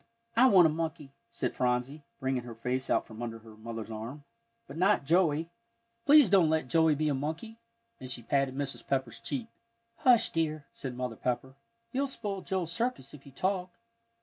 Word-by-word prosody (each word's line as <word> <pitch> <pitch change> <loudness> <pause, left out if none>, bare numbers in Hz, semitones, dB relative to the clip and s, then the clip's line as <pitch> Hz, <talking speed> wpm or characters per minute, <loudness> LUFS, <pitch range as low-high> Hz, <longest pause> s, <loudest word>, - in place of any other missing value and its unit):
"I 250 +3 +7
want 190 -8 +7
a - - +5
monkey," 160 -3 -4 0.2
said 115 - -2
Phronsie, 125 +4 0 0.2
bringing 130 -2 0
her 120 -1 -9
face 125 +3 -2
out - - +2
from 110 +1 -10
under 115 -1 -4
her 110 -1 -14
mother's 115 0 -7
arm, 115 +7 -6 0.4
"but 140 - -10
not 185 -2 +3
Joey. 165 0 +2 0.6
Please 295 -3 +8
don't 185 -4 +5
let 155 -4 +1
Joey 160 +2 +4
be 155 +1 0
a 150 - +2
monkey," 160 +12 -4 0.4
and 130 - -8
she 120 -1 -3
patted 135 +1 +1
Mrs. 140 -1 -4
Pepper's 130 -4 -1
cheek. 260 -4 -4 0.5
"Hush, 235 -3 +4
dear," 155 -2 -1
said 130 -2 -6
Mother 125 -2 -3
Pepper, 125 +1 -2 0.4
"you'll 275 +2 0
spoil 205 -7 -4
Joel's 185 -4 -2
circus 230 - -2
if 140 -1 -13
you - - -12
talk. 185 +5 -1
145 Hz, 180 wpm, -30 LUFS, 125-180 Hz, 0.6 s, Please